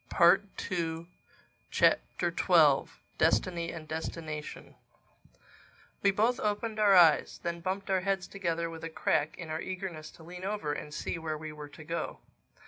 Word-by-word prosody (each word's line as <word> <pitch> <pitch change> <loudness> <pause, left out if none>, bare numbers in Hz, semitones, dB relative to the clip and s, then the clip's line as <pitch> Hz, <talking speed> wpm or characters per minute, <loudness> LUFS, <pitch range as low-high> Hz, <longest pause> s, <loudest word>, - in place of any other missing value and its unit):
THE 175 +2 +6 0.2
TWELFTH 165 -2 -3 0.6
CHAPTER - - +2 0.9
DESTINY 170 -2 +2
AND 160 -2 -8
DESTINATION 155 -1 -6 1.3
WE 200 - +4
both 220 +5 +2
opened 215 +1 -1
our 205 -2 +6
eyes; 165 -4 +5
then 170 0 -2
bumped 190 +3 -3
our 190 - +3
heads 195 -1 0
together 170 -4 -2
with 165 -1 -8
a 165 - -3
crack 155 -1 0
in 170 -3 -7
our 160 +1 -2
eagerness 180 -5 -5
to 160 - -15
lean 180 +2 -9
over 195 -7 -2
and 150 - -6
see 165 - -4
where 155 -1 -3
we 155 0 -7
were 150 -1 -9
to 155 - -12
go. 165 +2 -4
170 Hz, 150 wpm, -30 LUFS, 160-190 Hz, 1.3 s, THE